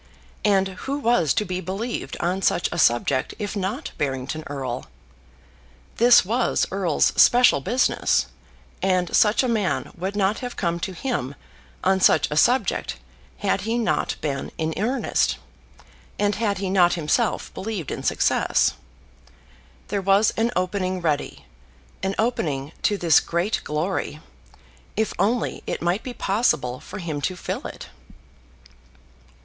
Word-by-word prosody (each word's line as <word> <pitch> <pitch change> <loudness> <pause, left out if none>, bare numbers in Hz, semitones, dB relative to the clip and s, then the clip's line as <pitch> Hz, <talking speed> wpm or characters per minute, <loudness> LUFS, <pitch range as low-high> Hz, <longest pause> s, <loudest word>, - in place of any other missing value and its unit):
And 195 -2 +3 0.2
who 280 +1 -1
was 235 - +2
to 210 - +1
be 185 -1 -3
believed 200 +6 -4
on 180 +3 -1
such 175 - +1
a - - -3
subject 130 +1 +2
if 205 0 -4
not 205 - -3
Barrington 135 +2 -2
Erle? 130 -3 -4 1.1
This 240 -1 +6
was 235 +5 +1
Erle's 185 -5 +1
special 245 - +6
business, 240 - +1 0.6
and 185 -2 +1
such 210 +4 +4
a - - +1
man 215 -5 -1
would 190 +3 -4
not 205 +1 +1
have 245 -1 -6
come 170 -2 -1
to 190 - -4
him 170 - -3 0.5
on 190 0 +3
such - - +5
a - - -1
subject 245 +11 +2 0.4
had - - 0
he 225 +2 -1
not 230 -2 0
been 140 -3 -3
in 160 0 -1
earnest, 240 +7 0 0.8
and 205 0 +1
had 210 -2 -1
he 190 -1 -2
not 180 -2 +4
himself 175 +8 0
believed 195 -7 -4
in - - -4
success. - - +2 1.2
There 200 0 -1
was 195 +3 +4
an 225 +1 +1
opening 185 0 -1
ready, 145 - -2 0.6
an 195 +1 -1
opening 155 - -1
to 205 - +1
this 165 -5 +5
great 175 +6 -1
glory, 155 0 -2 0.8
if 220 0 0
only 225 +6 0
it - - -2
might 175 +5 0
be 255 - -6
possible 165 - 0
for - - -9
him 160 -6 -4
to 185 +6 -1
fill - - -4
it! - - -10
190 Hz, 140 wpm, -23 LUFS, 165-220 Hz, 1.2 s, This